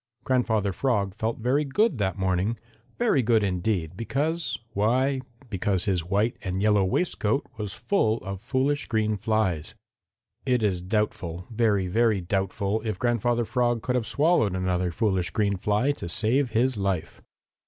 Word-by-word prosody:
Grandfather 110 -6 +1
Frog 100 -5 0
felt 115 +2 -2
very 125 +6 +1
good 150 - +1
that 95 -1 0
morning, 95 +4 0 0.4
very 230 - +3
good 115 -2 +3
indeed, 90 -3 -1
because 150 - -1 0.2
why, 130 +6 +1 0.3
because 95 -2 0
his 90 -4 +1
white 105 +6 0
and 95 0 -3
yellow 105 -1 +3
waistcoat 110 - 0
was 105 -3 -4
full 110 - +1
of 95 -1 -6
foolish 140 +4 0
green 110 -2 +1
flies. 100 -6 -1 0.7
It 125 -3 +1
is 95 -4 +1
doubtful, 90 -3 -2
very, 105 -4 +2
very 110 +2 +2
doubtful 95 +3 -1
if 110 -4 -3
Grandfather 120 +1 +1
Frog 120 0 0
could 125 - 0
have 120 -3 0
swallowed 140 - +2
another 90 -1 0
foolish 95 0 0
green 100 -1 0
fly 105 +8 +1
to 85 -11 -6
save 120 +8 +1
his 120 +2 +1
life. 95 -4 -2
110 Hz, 150 wpm, -26 LUFS, 95-120 Hz, 0.7 s, very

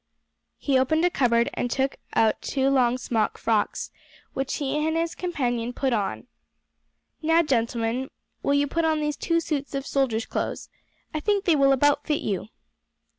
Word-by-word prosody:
He 270 -3 +2
opened 315 +6 +2
a 355 - +3
cupboard 235 -4 +2
and 245 - -2
took 265 +2 0 0.2
our 220 -1 +4
two 270 0 0
long 250 -2 +3
smock 230 -3 -1
frocks, 220 -2 0 0.4
which 270 0 -2
he 280 -2 -2
and 320 +1 0
his 335 0 -1
companion 245 -9 -2
put 265 0 0
on. 205 -3 -2 1.0
"Now, 325 +1 +4
gentlemen, 235 -1 0 0.3
will 280 - +2
you 285 0 +3
put 330 +4 -1
on 315 -1 +2
these 300 -1 -1
two 335 +3 +1
suits 290 -4 -3
of 275 0 -3
soldiers' 250 -6 0
clothes. - - -4 0.4
I 310 - -1
think 405 +4 0
they 335 - +4
will 275 -1 +4
about 290 +2 +3
fit 300 -2 +1
you." 200 -1 -2
275 Hz, 170 wpm, -25 LUFS, 240-310 Hz, 1.0 s, our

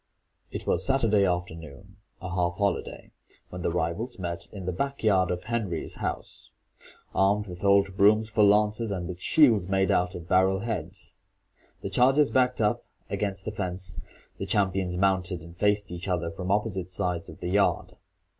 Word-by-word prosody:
It - - -6
was - - +1
Saturday 110 -7 +3
afternoon, 90 +1 -5 0.3
a 90 - -4
half 85 -1 0
holiday, 100 -1 -2 0.4
when 90 - -7
the - - 0
rivals 90 +8 -2
met 85 -2 -5
in 95 -3 -8
the 90 - -1
back 140 +10 -3
yard 95 -4 +3
of 90 0 -3
Henry's 110 -8 -3
house, - - -5 0.6
armed 100 +2 +2
with 90 -1 -9
old 100 -1 +3
brooms 105 +2 +5
for 105 -1 +2
lances, 105 +2 +3
and 90 -3 -3
with 90 0 -7
shields 115 - +4
made 95 0 +2
out 90 0 +1
of 85 -1 -8
barrel 95 +1 +3
heads. 95 -5 -5 0.6
The - - -5
chargers 135 +3 +4
backed 125 -1 +2
up 105 -1 +1 0.3
against 100 -2 -2
the 110 - -3
fence, 90 -2 -4 0.4
the 100 - -4
champions 95 -2 0
mounted 90 -3 0
and 85 +1 -12
faced 105 0 +1
each 90 +1 -6
other 85 -3 -1
from 90 +2 -6
opposite 95 -3 -1
sides 90 -2 -2
of - - -12
the 90 - -4
yard. 100 +1 +1
95 Hz, 170 wpm, -27 LUFS, 90-105 Hz, 0.6 s, brooms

